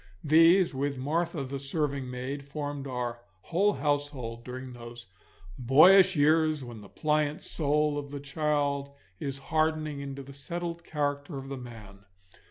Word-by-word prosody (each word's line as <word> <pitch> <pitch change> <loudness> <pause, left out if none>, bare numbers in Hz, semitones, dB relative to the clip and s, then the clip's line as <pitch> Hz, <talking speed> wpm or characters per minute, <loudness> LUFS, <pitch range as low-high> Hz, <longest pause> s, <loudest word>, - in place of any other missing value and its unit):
These, 165 +4 +5
with 140 +1 -2
Martha 155 +3 -1
the 135 +1 -5
serving 140 -2 -2
maid, 130 +3 -4
formed 145 -1 -5
our 120 -2 -3 0.2
whole 200 - +2
household 145 -7 -2
during 130 +1 -7
those 120 0 -10 0.5
boyish 180 +10 +7
years 155 0 +3
when 120 -3 -9
the 100 - -13
pliant 150 -1 0
soul 150 -1 +1
of 140 -1 -7
the 145 0 -6
child 140 -1 -1 0.2
is 140 -2 -4
hardening 155 0 -1
into 140 0 -6
the 140 +1 -11
settled 170 +4 -5
character 145 0 -2
of 135 0 -7
the 135 - -4
man. 110 -5 -11
145 Hz, 145 wpm, -29 LUFS, 130-155 Hz, 0.5 s, boyish